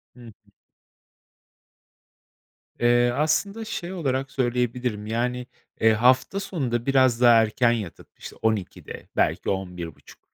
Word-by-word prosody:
Hı - - -17
hı. 120 -2 -12 2.5
Eee, 120 0 +3
aslında 200 +9 0
şey 190 -5 -5
olarak 135 -6 -2
söyleyebilirim, 125 -3 -2
yani, 125 +2 -2 0.3
eee, 110 0 +5
hafta 130 - +3
sonunda 130 - -3
biraz 130 -3 +3
daha 120 -1 +7
erken 115 +2 +2
yatıp, 105 -7 -5
işte, - - -10
12.00'de, 110 -4 -3
belki - - 0
11.30. 90 -4 -6
120 Hz, 110 wpm, -24 LUFS, 110-135 Hz, 2.5 s, daha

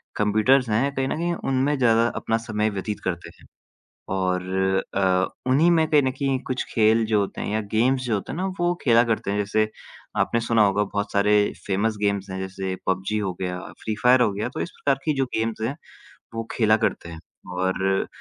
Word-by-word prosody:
Computers 110 +5 +3
हैं, 135 +6 +1
कहीं 135 0 0
न - - -1
कहीं 175 +1 -1 0.2
उनमें 135 +2 +1
ज़्यादा 115 -2 +4
अपना 115 - 0
समय 110 -1 -1
व्यतीत 105 0 -4
करते 90 -2 -3
हैं - - -18 0.7
और 90 -1 0 0.5
अ, 95 -1 +2 0.2
उन्हीं 150 +6 +4
में 160 -2 +3
कहीं 150 -2 +5
न 130 - +1
कहीं 135 0 -1
कुछ 130 - -1
खेल 110 0 +4
जो 110 -1 +2
होते 100 - -3
हैं - - -3
या 110 - +1
गेम्स 125 +4 +2
जो 120 - -1
होते 100 - -4
हैं 155 - -5
ना 185 - -1
वो 175 0 +2
खेला 115 -2 +5
करते 110 -4 -1
हैं। 100 - -1
जैसे 105 +1 +1 0.5
आपने 115 - +1
सुना 115 -1 +2
होगा 100 +1 +2
बहुत 100 0 -3
सारे 105 +1 +3 0.3
फ़ेमस 105 +3 0
गेम्स 100 -1 0
हैं 95 - -5
जैसे 95 0 -4
पबजी 95 +3 0
हो 95 -3 -2
गया, 90 0 -2 0.2
फ़्री 110 -1 -2
फ़ायर 125 +1 +6
हो 110 - +3
गया, 105 +5 -3
तो 155 - -7
इस - - -3
प्रकार 135 -1 0
की 155 - +2
जो 135 - +2
गेम्स 110 0 -2
हैं 120 +6 -1 0.6
वो 115 0 -4
खेला 110 -2 +3
करते 110 -6 -2
हैं 80 -1 -9 0.3
और 95 +1 -1 0.2
अ, - - -5
110 Hz, 210 wpm, -24 LUFS, 100-130 Hz, 0.7 s, फ़ायर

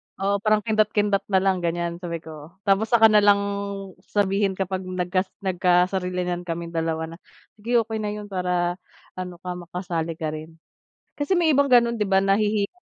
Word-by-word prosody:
Oo, 200 +1 0
parang 215 0 +2
kindat-kindat 210 -2 +1
na 190 -1 +2
lang 190 -2 +2
ganyan 170 0 -2
sabi 170 -2 -5
ko. 155 +1 -11
Tapos 200 +3 +2
saka 225 -2 +6
na 210 - +6
lang 205 0 +6 0.6
sabihin 195 0 0
kapag 190 0 -2
nagka 185 +1 -1 0.2
nagkasarilinan 180 -1 +1
kaming 170 0 -4
dalawa 160 -1 -1
na, 165 - -10 0.4
"Sige, 235 +1 +2
okey 220 0 -4
na 210 0 -3
'yon 205 -1 -8
para 180 -1 -1 0.4
ano 180 -1 -5
ka, 180 - -4
makasali 170 -2 -4
ka 155 -1 -3
rin." 155 +1 -8 0.6
Kasi 350 +5 +1
may 315 -5 +3
ibang 280 -1 +3
gano'n, 235 -1 +5
'di 215 - 0
ba? 190 -1 +3
Nahihiya 200 +1 +2
190 Hz, 170 wpm, -24 LUFS, 175-210 Hz, 0.6 s, saka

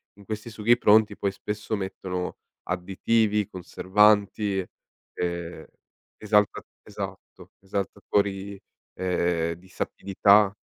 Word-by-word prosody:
in 100 0 -17
questi 110 +2 -5
sughi 110 +3 +3
pronti 105 -2 +4
poi 100 - 0
spesso 105 +2 -4
mettono 95 -2 -4 0.3
additivi, 105 +4 +1
conservanti, 100 +1 +2 0.5
ehm, 85 -1 -4 0.5
esalta 105 -1 +2 0.2
esatto, 95 -2 -8
esaltatori, 100 0 -2 0.3
ehm, 85 -2 0
di 85 +3 -16
sapidità. 100 +2 +3
100 Hz, 90 wpm, -26 LUFS, 95-105 Hz, 0.5 s, pronti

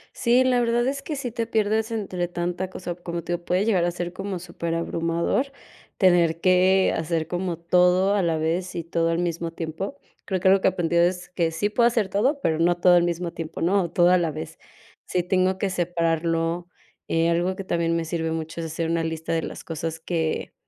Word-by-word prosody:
Sí, 245 +1 +3
la 255 -1 +3
verdad 240 0 +1
es 275 +1 -2
que 305 - -4
sí 265 -4 -4
te 230 0 -3
pierdes 220 0 +1
entre 190 -6 -2
tanta 175 +1 -3
cosa, 180 -2 -6
como 170 -1 -5
te 175 - -5
digo, 175 0 -4
puede 180 +3 +1
llegar 190 -6 +2
a 175 - 0
ser 175 0 -4
como 195 -1 -4
superabrumador 170 +7 -1 0.5
tener 170 -3 +3
que 185 +1 +4
hacer 160 0 -1
como 175 -1 -2
todo 180 +3 +3
a 205 - +2
la 165 -2 +1
vez 170 +4 -1
y 170 - -3
todo 165 0 0
al 165 0 0
mismo 170 -1 -2
tiempo. 165 - -5 0.3
Creo 190 -3 -1
que 190 - +2
algo 195 +1 +6
que - - +2
aprendí 170 -2 -2
es 180 +1 +1
que 170 -2 0
sí 205 +6 -1
puedo 235 +3 +3
hacer 225 -5 0
todo, 255 +10 +1
pero 160 -2 +1
no 175 +1 +3
todo 175 0 +5
al 175 - +5
mismo 175 0 -2
tiempo, 165 -1 -6
no 185 +1 +2
todo 175 0 +4
a 185 - +5
la 170 -3 0
vez. 155 +1 -7 0.5
Sí 180 - 0
tengo 185 +1 +1
que 200 - 0
separarlo. 165 -1 0 0.4
Eh, 165 0 +2
algo 175 +2 +1
que 195 - -6
también 170 -2 0
me 165 - 0
sirve 160 0 -2
mucho 160 0 -4
es - - -4
hacer 160 +1 -3
una 165 0 0
lista 160 0 -4
de 165 -1 0
las - - -7
cosas 165 0 -4
que 160 -1 -2
175 Hz, 215 wpm, -24 LUFS, 165-190 Hz, 0.5 s, algo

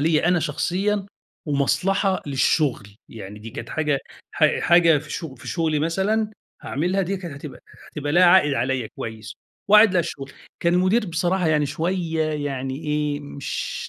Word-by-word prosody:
ليّا 160 +2 +2
أنا 175 -1 +3
شخصيًا 195 +5 -1 0.4
ومصلحة 185 +7 +1
للشغل. 135 -4 +1 0.2
يعني 105 -2 -9
دي 110 +2 -9
كانت 125 - -7
حاجة 150 -3 0 0.3
ح - - +2
حاجة 170 -2 +5
في 150 +1 -11
شغ 160 -6 -5
في 120 - -11
شغلي 160 -3 0
مثلًا 195 +8 0 0.3
هاعملها 180 +7 -1
دي 195 +2 -2
كانت 175 -5 -7
هتبقى 140 0 -9 0.3
هتبقى 145 -1 -3
ليها 180 +2 +6
عائِد 175 -5 +5
عليّا 130 -2 -1
كويس 110 -1 -7 0.4
وعائِد 210 -2 +7
للشغل. 145 -5 -3 0.3
كان 170 +1 +2
المُدير 190 +5 +2
بصراحة 175 +1 0
يعني 150 -2 +2
شوية 165 +2 -1 0.2
يعني 135 -1 -3
إيه، 150 -1 -1
مش 140 -1 -5
160 Hz, 150 wpm, -23 LUFS, 140-180 Hz, 0.4 s, وعائِد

